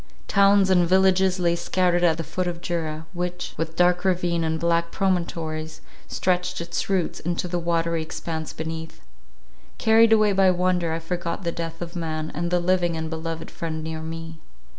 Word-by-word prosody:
Towns 200 -1 +4
and 175 -2 +4
villages 190 0 +4
lay 170 -2 +2
scattered 175 0 +1
at 165 -2 +4
the 165 - -3
foot 180 +4 -3
of 170 -1 -3
Jura, 160 -2 -3
which, 180 0 -4
with 160 +1 -4
dark 180 +1 +3
ravine, 175 -3 +1
and 160 0 -1
black 170 0 +1
promontories, 165 -4 -2 0.3
stretched 180 0 0
its 170 +2 -3
roots 190 -4 0
into 175 +1 -2
the 175 0 -2
watery 170 -1 0
expanse 160 0 -5
beneath. 160 0 -6 0.8
Carried 225 0 +5
away 215 -2 +5
by 190 -1 +5
wonder, 180 -2 +1
I 160 - -1
forgot 170 +2 -4
the 170 - -1
death 165 0 -5
of 170 +1 -8
man, 155 -2 -3
and 170 +3 -2
the 180 0 +2
living 175 -1 +1
and 160 0 -4
beloved 160 0 -5
friend 160 -1 -4
near 160 0 -4
me. 165 0 -7
170 Hz, 175 wpm, -24 LUFS, 165-180 Hz, 0.8 s, Carried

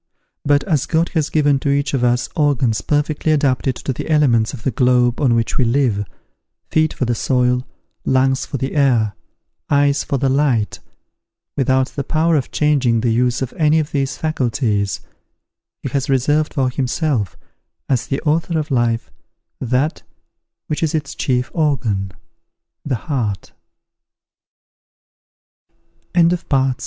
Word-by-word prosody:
But, 145 0 +3
as 155 -8 0
God 165 +1 +1
has 155 -4 -1
given 145 -3 +2
to 140 - -2
each 140 0 0
of 130 -3 0
us 120 0 +2
organs 135 -7 +1
perfectly 150 +1 0
adapted 135 -3 +1
to 135 - -4
the 125 - -6
elements 125 -8 +3
of 125 -4 -9
the 135 - 0
globe 125 -1 +2
on 125 -5 +3
which 115 -1 -1
we - - +4
live, 115 -4 +1 0.7
feet 155 -1 +2
for 130 - -2
the 120 - 0
soil, 125 +1 +1 0.4
lungs 130 0 +2
for 140 - -4
the 135 0 -3
air, 120 -8 +2 0.6
eyes 145 0 +3
for 140 - -1
the 135 +1 0
light, 130 -6 +1 0.8
without 130 -1 +1
the 140 - -4
power 160 +3 +1
of 140 -5 0
changing 135 -7 +2
the 120 0 +1
use 125 +2 +1
of 130 - -5
any 155 -1 +3
of 155 -2 -1
these 135 -2 -1
faculties, 115 -9 -1 0.8
he 135 - -2
has 135 +1 -2
reserved 145 +4 +1
for 130 -2 +1
himself, 130 - -1 0.5
as 130 -3 0
the 135 - -1
Author 165 +2 0
of 155 -1 -3
life, 120 -2 0 0.5
tha 130 +5 +1
135 Hz, 125 wpm, -19 LUFS, 125-150 Hz, 0.8 s, we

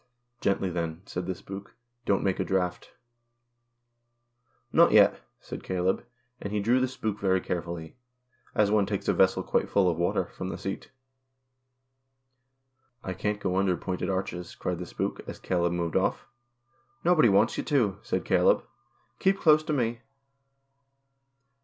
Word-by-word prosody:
" 120 0 -46
Gently 95 -1 +1
then," 85 0 -3
said 90 -2 -5
the 95 - -2
spook; 95 +2 -9
" 120 0 -48
don't 100 - +2
make 95 -2 0
a - - +2
draught." 90 -2 -1 0.9
" 120 0 -45
Not - - +6
yet," - - +6 0.2
said - - -8
Caleb, 95 0 0 0.4
and 100 - -5
he 105 - 0
drew 120 +5 +3
the 130 - +2
spook 110 -5 -4
very 95 -1 +2
carefully 85 -2 -5 0.6
(as 105 -2 +3
one 105 -2 +3
takes 100 -2 -3
a - - +4
vessel 95 0 +3
quite - - 0
full 100 -2 +3
of 85 -2 +1
water) 85 - +1
from 95 - -4
the - - -4
seat. 95 - -5 1.0
" 130 0 -47
I 95 - -3
can't 105 +3 -2
go 95 -2 -1
under 95 -2 +2
pointed 90 0 -3
arches," 90 -2 -3
cried 90 -2 -3
the 90 - -6
spook, - - -3
as - - -6
Caleb 85 -1 0
moved 85 -1 -2
off. - - +1 0.4
" 130 +1 -40
Nobody 165 -9 +5
wants 105 +3 +3
you - - -1
to," 110 -10 +1
said - - -2
Caleb. - - +3 0.3
" - - -41
Keep 195 +1 +2
close 155 -2 +5
to - - -2
me." 120 -4 -1
100 Hz, 170 wpm, -28 LUFS, 90-120 Hz, 1.0 s, Not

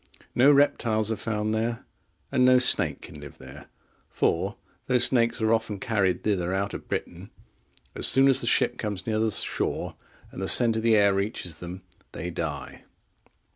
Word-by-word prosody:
No 135 +4 +5
reptiles 115 -6 +1
are - - -1
found 110 0 -3
there, 115 +1 -3 0.5
and 125 - +2
no 130 0 +5
snake 125 - +3
can 75 - -11
live 75 - -12
there; 65 +3 -13 0.4
for, - - -1 0.3
though 125 - +2
snakes 120 -2 +2
are 110 +1 +2
often 110 -3 -2
carried 100 -4 -1
thither 95 -3 -1
out 100 +1 -3
of - - -8
Britain, - - -6 0.6
as - - +4
soon 135 +1 +4
as 135 - +3
the - - -3
ship - - +2
comes 100 -4 -5
near 110 -1 -1
the 110 0 +1
shore, 105 - -1 0.4
and - - -9
the 95 - -3
scent 115 +1 +3
of 110 - -2
the 115 0 +3
air 100 -1 +3
reaches 95 -4 -4
them, 90 +1 -9 0.3
they 90 +1 -6
die. 75 -5 -6
110 Hz, 175 wpm, -25 LUFS, 95-115 Hz, 0.6 s, No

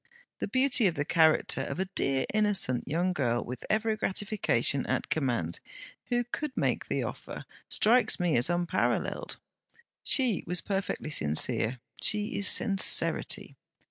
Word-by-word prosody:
The - - -3
beauty 260 -4 +2
of 170 - -1
the 145 -1 -2
character 160 -1 +2
of - - -5
a 190 - 0
dear 135 -8 -1
innocent 205 - +1
young 175 +5 0
girl, 120 -7 -1
with 125 0 -7
every 220 +1 +1
gratification 190 - 0
at - - -2
command, 120 - -1 0.5
who 245 0 0
could 260 +3 -6
make - - -1
the - - -1
offer, - - -7 0.2
strikes 240 +3 +2
me 175 -3 +1
as 120 +7 +3
unparalleled. 175 0 -1 0.6
She 250 -8 +5
was 180 +1 -1
perfectly 195 -4 -3
sincere 115 - 0 0.2
she 210 +3 +2
is 200 - +2
sincerity. 195 -2 +1
180 Hz, 140 wpm, -28 LUFS, 135-215 Hz, 0.6 s, She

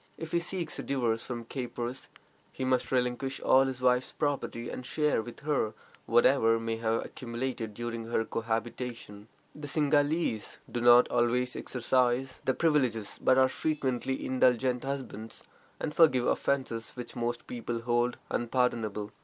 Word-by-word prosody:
If 165 -1 -7
he 170 - +2
seeks 170 -1 -3
a - - -1
divorce 120 -5 0
from 120 -2 -5
caprice, 125 0 -5 0.4
he 130 - -4
must 130 -1 +1
relinquish 130 +1 0
all 135 +1 +5
his 130 -1 -4
wife's 125 0 +2
property, 140 -5 -2
and - - -6
share 150 -1 +1
with 120 +4 -10
her 140 -7 0 0.3
whatever 115 -1 +4
may 115 0 -2
have 115 0 0
accumulated 120 -3 -4
during 115 0 -4
their 115 -1 +1
cohabitation. 115 -2 -4 0.3
The 150 -1 -8
Singhalese 145 -4 +1
do 120 - -2
not 120 +1 +7
always 125 +1 +1
exercise 125 +1 0
their 130 - +2
privileges, 130 -10 +1
but 130 - +5
are 130 0 +6
frequently 135 -3 -2
indulgent 125 -1 +2
husbands, 135 -5 -5 0.4
and 150 - -3
forgive 130 -7 +5
offenses 130 -5 -1
which 125 -1 -7
most 120 0 -2
people 120 -1 -4
hold 120 +1 +1
unpardonable. 115 -4 0
125 Hz, 145 wpm, -30 LUFS, 115-135 Hz, 0.4 s, not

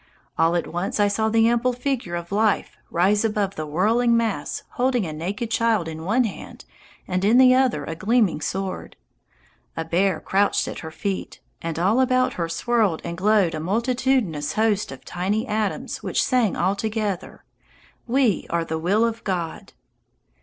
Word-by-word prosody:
All 165 +1 +2
at 175 - 0
once 175 +5 -3
I 205 - +4
saw 220 +2 0
the 225 0 +4
ample 240 +2 +2
figure 245 -8 -2
of 170 +1 -6
Life 210 0 +1
rise 195 +5 +2
above 210 -3 0
the 155 -3 -5
whirling 230 +9 +2
mass 220 -10 -2
holding 245 -4 0
a 155 - -5
naked 200 +9 -4
child 225 -6 +1
in 160 0 -6
one 230 +7 +3
hand 220 - -7 0.4
and 185 0 -1
in 220 +5 +5
the 255 0 +7
other 260 -1 +2
a 165 - -4
gleaming 200 -1 +1
sword. 190 +4 -4 0.8
A 165 - -2
bear 180 +1 +1
crouched 200 +1 +1
at - - -5
her 160 - -7
feet, 195 +4 -4 0.2
and 165 -1 -4
all 200 +9 +3
about 255 0 +2
her 170 -2 -3
swirled 210 -1 +1
and 170 - -4
glowed 195 -1 +2
a 155 - -3
multitudinous 215 - 0
host 215 -3 +1
of 135 - -11
tiny 195 +6 -1
atoms 215 -2 -2
which - - 0
sang 245 -6 +2
all 195 - +1
together, 215 -2 -3 0.6
"We 245 -5 +1
are 170 0 0
the 160 0 -3
will 200 +7 +2
of 230 0 -3
God." 175 -5 -4
205 Hz, 170 wpm, -23 LUFS, 170-230 Hz, 0.8 s, the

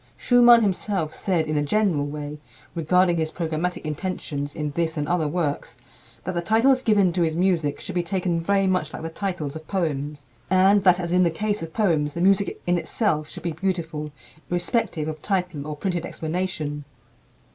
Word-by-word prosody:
Schumann 240 -2 +6
himself 190 -4 -1
said, 175 -5 0
in 155 - -2
a - - +2
general 160 -3 +1
way, 150 0 -6 0.3
regarding 175 +2 +2
his 160 -1 0
programmatic 165 +2 -3
intentions 150 -3 -4
in 150 -2 -3
this 160 +1 -1
and 145 0 -1
other 170 -3 +1
works, 150 -2 -2 0.5
that 185 - -3
the 170 - -1
titles 235 +8 +3
given 205 -7 +3
to 180 - 0
his 160 -2 +1
music 170 -5 +1
should - - -6
be 180 - +1
taken 175 -1 -1
very 195 +3 +2
much 185 -4 0
like - - -6
the 165 - -4
titles 160 -6 -3
of 160 0 -9
poems, 150 -6 -2 0.2
and 190 +2 +5
that, 180 -1 +6
as 170 -1 -3
in 180 +1 +4
the 175 - +4
case 210 +4 -2
of 165 -1 -6
poems, 160 -8 +1
the - - -3
music 195 +2 +2
in 175 0 +2
itself 155 -7 -1
should - - -9
be 170 - -1
beautiful, 160 -3 -3 0.4
irrespective 175 -3 0
of 155 -1 -5
title 180 -7 -2
or 150 - -4
printed 175 +2 -2
explanation. 160 -4 -3
170 Hz, 185 wpm, -24 LUFS, 155-190 Hz, 0.5 s, Schumann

